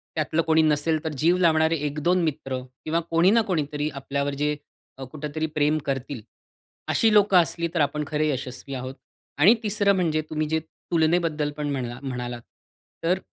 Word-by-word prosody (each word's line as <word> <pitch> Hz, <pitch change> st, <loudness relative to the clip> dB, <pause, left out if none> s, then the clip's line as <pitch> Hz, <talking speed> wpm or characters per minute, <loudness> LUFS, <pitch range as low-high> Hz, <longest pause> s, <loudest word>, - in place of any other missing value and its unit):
त्यातलं 155 Hz, +1 st, +1 dB
कोणी 160 Hz, -1 st, +3 dB
नसेल 155 Hz, +1 st, +1 dB
तर 160 Hz, -, -2 dB
जीव 170 Hz, +3 st, +4 dB
लावणारे 160 Hz, -2 st, +3 dB
1-2 155 Hz, +5 st, +1 dB
मित्र 140 Hz, -4 st, -2 dB, 0.3 s
किंवा 160 Hz, +2 st, +1 dB
कोणी 170 Hz, +3 st, +4 dB
ना 230 Hz, +1 st, +5 dB
कोणीतरी 150 Hz, -3 st, -1 dB
आपल्यावर 140 Hz, +1 st, -2 dB
जे 150 Hz, +1 st, 0 dB, 0.4 s
अ, 135 Hz, -, -7 dB
कुठेतरी 150 Hz, +3 st, -4 dB
प्रेम 150 Hz, +1 st, +3 dB
करतील 135 Hz, -2 st, -3 dB, 0.7 s
अशी 225 Hz, -, +3 dB
लोकं 205 Hz, -2 st, +5 dB
असली 170 Hz, -1 st, +2 dB
तर 170 Hz, -, 0 dB
आपण 150 Hz, +1 st, 0 dB
खरे 155 Hz, 0 st, 0 dB
यशस्वी 130 Hz, 0 st, -5 dB
आहोत. 130 Hz, +1 st, -6 dB, 0.4 s
आणि 170 Hz, +10 st, +7 dB
तिसरं 205 Hz, -1 st, +2 dB
म्हणजे 160 Hz, -4 st, +1 dB
तुम्ही 155 Hz, 0 st, -1 dB
जे 160 Hz, 0 st, +1 dB
तुलनेबद्दल 160 Hz, -1 st, 0 dB
पण 150 Hz, -1 st, -2 dB
म्हणला 125 Hz, -3 st, -4 dB
म्हणालात, 125 Hz, -2 st, -4 dB, 0.6 s
तर 180 Hz, +3 st, +2 dB
155 Hz, 160 wpm, -25 LUFS, 140-165 Hz, 0.7 s, आणि